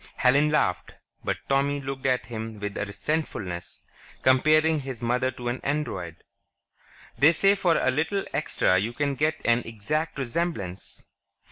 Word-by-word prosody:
Helen 140 +4 +4
laughed, 150 - 0 0.3
but - - -1
Tommy 140 +1 +1
looked 135 -1 -4
at 125 -1 +1
him 110 -2 -6
with 105 -1 -4
a 100 - -2
resentfulness. 100 - -4 0.4
Comparing 155 +4 +4
his 130 -4 -6
mother 125 +2 +1
to 120 -1 -7
an 120 +2 -2
Android.... 95 - -3 1.0
"They 150 +4 +7
say 195 +4 +4
for 180 -4 +2
a 130 - +2
little 160 +8 -1
extra 95 0 +2
you 110 +5 -2
can 140 +1 0
get 155 +3 0
an 120 0 +4
exact 125 +9 -3
resemblance. 115 - -3
130 Hz, 145 wpm, -26 LUFS, 110-150 Hz, 1.0 s, They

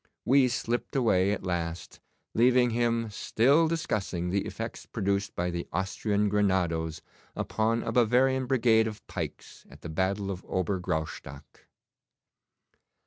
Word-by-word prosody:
We 135 0 +5
slipped 120 +2 -2
away 100 -7 +3
at 105 - -3
last, 85 -2 -4 0.3
leaving 125 +1 +4
him 115 -1 0
still 140 +10 +3
discussing 100 - -2
the 100 +1 0
effects - - -6
produced 100 +1 -1
by 90 +1 -1
the 85 0 -4
Austrian 100 +3 0
grenadoes 90 -6 0 0.3
upon 115 +1 0
a - - -2
Bavarian 125 +3 +3
brigade 115 -4 +3
of 110 -1 -8
pikes - - -7
at - - -15
the 85 - -7
battle 95 +4 -1
of 90 -1 -6
Ober 95 +1 -1
Graustock. 80 -5 -5
105 Hz, 130 wpm, -28 LUFS, 90-120 Hz, 0.3 s, We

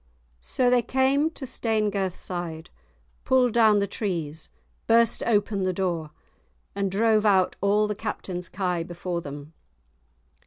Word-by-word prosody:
So 245 - 0
they 250 -1 +4
came 265 +5 +2
to 310 -4 -8
Stanegirthside, 190 -8 -2 0.5
pulled 255 -3 +3
down 220 -3 +5
the 200 - +2
trees, 165 -7 -4 0.4
burst 230 0 +4
open 205 -2 +1
the 185 0 0
door, 175 -4 -2 0.6
and 200 -1 -1
drove 215 +2 +2
out 190 -3 +3
all 205 +2 +2
the 210 - -2
Captain's 190 -4 -5
kye 180 -3 -1
before 175 0 -4
them. 145 +1 -9
200 Hz, 125 wpm, -25 LUFS, 175-225 Hz, 0.6 s, down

